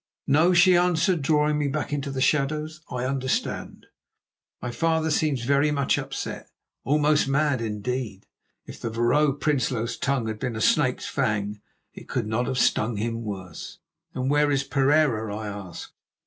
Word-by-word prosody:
"No," 155 +6 +4
she 180 +1 +6
answered, 175 0 +2
drawing 150 +1 +2
me 145 - 0
back 145 +1 -3
into 140 -1 -2
the 135 -1 -3
shadows, 155 +2 0
"I 125 0 -3
understand. 130 -1 -2 0.7
My 125 - -4
father 160 +2 0
seems 145 -5 +1
very 140 +3 +3
much 140 -2 +1
upset, - - -6 0.3
almost 150 +1 +2
mad, 140 -2 +1
indeed. 110 -1 -4 0.4
If - - -11
the 115 - -2
Vrouw 120 +6 +2
Prinsloo's 125 -5 0
tongue 135 -4 0
had 110 -1 -4
been 125 -2 -3
a - - -4
snake's 125 +2 +2
fang, 105 -5 -1 0.3
it - - -12
could 125 -4 -1
not 110 +3 -1
have 130 - -2
stung 110 -2 +1
him 115 +2 -2
worse." 95 -6 -7 0.4
"And 130 0 -2
where 145 0 +3
is 140 -1 +1
Pereira?" 135 -7 +1
I 110 -1 -5
asked. 100 -4 -8
135 Hz, 160 wpm, -25 LUFS, 115-150 Hz, 0.7 s, she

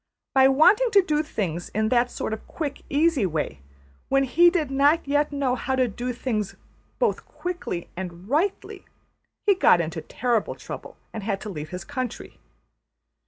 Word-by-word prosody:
By 265 0 +6
wanting 375 - +5
to 400 -2 +7
do 300 -3 +1
things 180 - -3
in 215 0 +1
that 245 0 +3
sort 220 - -4
of 220 - -7
quick, 295 -4 -4
easy 290 - +2
way, 150 - -3 0.5
when 275 0 +3
he 340 +7 +5
did 320 -6 -1
not 285 +3 +3
yet 290 +1 +1
know 280 -3 0
how 265 +1 -1
to 255 -1 +2
do 240 +4 -4
things 225 -5 -3 0.4
both 480 - 0
quickly 350 - -5
and 180 0 -7
rightly, 320 - -1 0.6
he 410 - +6
got 365 - +5
into 160 0 -3
terrible 235 +2 -1
trouble - - -9 0.2
and 220 - -5
had 200 -1 -2
to 215 - -6
leave 155 -5 -6
his 180 +1 -6
country. 255 -4 -5
255 Hz, 165 wpm, -25 LUFS, 205-300 Hz, 0.6 s, to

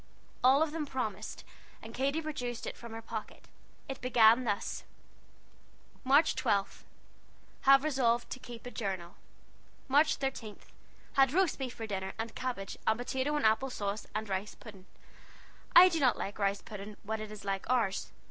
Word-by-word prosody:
All 270 +4 +6
of 315 - -2
them 310 -2 -3
promised, 220 -6 -4 0.4
and 225 +1 -10
Katy 280 +6 0
produced 245 -6 -4
it - - -5
from 235 -1 -10
her 225 0 -7
pocket. 220 -1 -7 0.4
It 270 0 -6
began 240 -1 +5
thus: 205 -3 -2 1.2
"March 285 +5 +5
12. 200 -1 0 0.9
Have 275 0 +8
resolved 245 -5 +1
to 255 - -5
keep 240 -2 -10
a 245 - -6
jurnal. 190 -6 -4 0.7
March 290 +3 +4
13. 245 -6 -4 0.6
Had 270 0 +4
rost 370 -3 +2
befe 260 -2 -3
for 225 - -6
diner, 190 -2 -4
and 225 0 -4
cabage, 240 -7 -4
and 220 - +3
potato 265 +4 -1
and 295 - 0
appel 220 +5 +3
sawse, 205 -3 -4
and 215 0 -2
rice 195 +2 -3
puding. 195 -4 -13 0.9
I 360 +1 +11
do 340 -3 0
not 260 -4 +3
like 205 +2 -5
rice 200 0 0
puding 210 0 -8
when 220 +1 -3
it 215 -1 -7
is 210 -1 -9
like 195 -1 -3
ours. 230 -6 0
235 Hz, 165 wpm, -31 LUFS, 210-270 Hz, 1.2 s, I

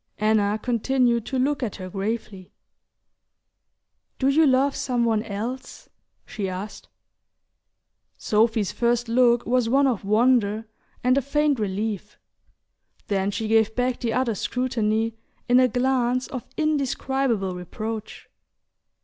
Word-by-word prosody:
Anna 215 -1 +2
continued 240 0 +1
to 265 - -2
look 280 +3 0
at 235 -6 -3
her 185 -2 -7
gravely. 195 -1 -5 1.7
"Do 265 - +2
you 305 +2 +4
love 270 +1 +3
some 245 -2 0
one 220 -2 +1
else?" 230 +5 -6 0.4
she 195 -3 -4
asked. 190 +3 -7 1.3
Sophy's 220 -1 +1
first 240 0 0
look 240 0 +3
was 245 -1 +1
one 275 +3 +4
of 245 -7 0
wonder 220 0 +2 0.4
and 255 +2 +4
a - - -3
faint 290 0 +1
relief; 210 0 -3 0.9
then 195 -1 +1
she 220 +2 -3
gave 220 0 +2
back 250 0 0
the 235 -2 -1
other's 235 -5 0
scrutiny 225 -3 -1 0.3
in 245 +1 +5
a 255 - +5
glance 250 0 +1
of 255 -4 -6
indescribable 270 - 0
reproach. 215 +5 -6
235 Hz, 125 wpm, -24 LUFS, 215-255 Hz, 1.7 s, in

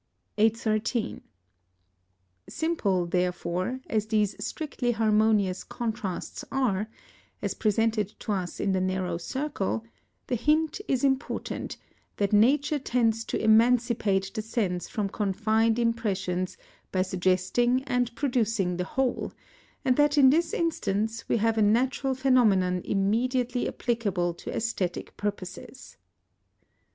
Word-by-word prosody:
813. 225 +1 +1 1.3
Simple, 205 - 0
therefore, 180 +6 -1
as 215 -1 -1
these 215 -2 +1
strictly 260 -6 -2
harmonious 215 -3 +2
contrasts 220 -6 -4
are, 220 -6 0 0.5
as - - -1
presented 215 -1 +1
to 220 - -3
us 185 -3 -3
in 195 - +1
the 190 -1 +1
narrow 185 -2 -1
circle, 245 - -3 0.4
the - - -4
hint 305 - +1
is 260 -1 0
important, 270 0 -1 0.4
that 200 0 0
nature 280 +7 +4
tends 230 -4 +1
to - - -2
emancipate 220 -3 +3
the 215 - -2
sense 200 -5 -2
from 210 -2 -1
confined 220 +3 +1
impressions 195 -6 -1 0.3
by 185 -1 +2
suggesting 185 +7 +1
and 245 -3 -1
producing 225 -9 0
the 180 - -1
whole, 255 +6 -1 0.5
and 255 -1 +3
that 295 0 +3
in 265 -2 +7
this 330 +2 +2
instance 225 -8 -1
we - - +3
have 225 0 +1
a - - +3
natural 260 +5 +2
phenomenon 215 -9 +3
immediately 245 +5 0
applicable 200 -8 -1
to 170 - -9
æsthetic 195 -6 -2
purposes. 205 +5 -6
220 Hz, 115 wpm, -27 LUFS, 195-250 Hz, 1.3 s, in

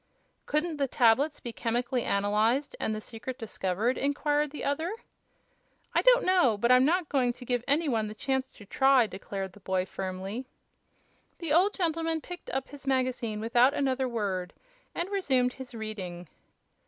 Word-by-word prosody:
"Couldn't 305 +2 0
the 280 -1 +1
tablets 260 +5 +3
be 235 - -6
chemically 240 +2 -1
analyzed, 215 +7 +1
and 215 - -1
the - - -4
secret 240 +3 -7
discovered?" 220 0 -1
inquired 290 +1 +1
the 295 - -7
other. 315 +6 -1 1.0
"I - - +4
don't - - +5
know; 355 - +4
but 235 +4 +2
I'm 250 0 +7
not 340 +4 +2
going 260 -4 +2
to 250 +1 -11
give 245 -1 0
any 300 +3 +2
one 225 -5 0
the 210 - -7
chance 265 0 -1
to 205 - -14
try," 265 +3 +4
declared 195 -1 -6
the 205 - -15
boy, 185 -1 -1
firmly. 190 +6 -5 0.9
The 330 -4 -2
old 375 +6 +4
gentleman 330 -2 0
picked 355 +3 -9
up 265 +1 -3
his 280 -1 -12
magazine 255 -5 0
without 245 +5 +4
another 265 -2 0
word, 195 -6 -2 0.4
and 345 - -1
resumed 260 -11 +1
his 260 -2 -9
reading. 190 -6 -6
255 Hz, 165 wpm, -29 LUFS, 215-285 Hz, 1.0 s, I'm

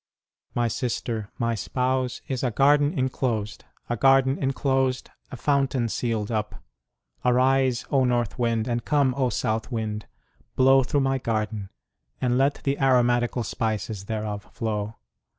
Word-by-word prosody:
My 120 -1 +2
sister, 115 -2 -3
my 115 0 0
spouse, 130 +2 -1
is 130 -3 -2
a 125 - +2
garden 145 - +3
enclosed; 125 -5 -2 0.2
a 120 - -1
garden 135 +2 +4
enclosed, 135 -1 0 0.2
a 130 - -7
fountain 135 -3 +1
sealed 115 -2 -2
up.... 105 -1 -2 0.7
Arise, 130 0 +2
O 135 -2 +4
north 120 -3 0
wind, 115 -1 +1
and 120 -1 -1
come, 140 -3 +2
O 130 -2 +1
south 110 0 -2
wind; 110 -2 -3 0.5
blow 135 +1 +6
through 140 +2 0
my 135 0 +1
garden; 110 -4 -2 0.5
and 125 -1 +1
let 135 +2 +2
the 140 0 0
aromatical 120 -2 +2
spices 105 -1 -3
thereof 105 -1 -4
flow. 110 -2 -3
125 Hz, 135 wpm, -25 LUFS, 110-135 Hz, 0.7 s, blow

